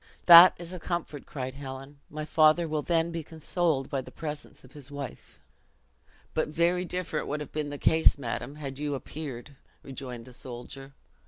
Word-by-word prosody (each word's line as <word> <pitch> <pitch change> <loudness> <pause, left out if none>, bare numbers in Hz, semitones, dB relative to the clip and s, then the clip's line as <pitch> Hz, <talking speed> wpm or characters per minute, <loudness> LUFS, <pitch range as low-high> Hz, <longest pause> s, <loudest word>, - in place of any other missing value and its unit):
"That 175 +1 +11
is 175 +1 -8
a 180 - -6
comfort," 160 -4 -4
cried 130 -2 -5
Helen; 135 +1 -9
"my 155 0 -5
father 155 +2 +4
will 155 -1 -1
then 165 +1 +1
be 165 0 -3
consoled 160 -2 -1
by 135 - -1
the - - -11
presence 150 -2 -7
of 130 - -16
his 145 -1 -10
wife." 140 -1 -8 0.9
"But 155 - 0
very 170 +4 +1
different 180 -4 -3
would 150 +2 -2
have 150 - -7
been 150 -1 -3
the 145 - -5
case, 160 +2 +4
madam, 140 +2 -4
had 140 -2 -7
you 145 -1 -1
appeared," 140 -2 -7 0.3
rejoined 125 -3 -8
the 125 - -13
soldier. 130 +3 -9
150 Hz, 175 wpm, -28 LUFS, 135-160 Hz, 0.9 s, That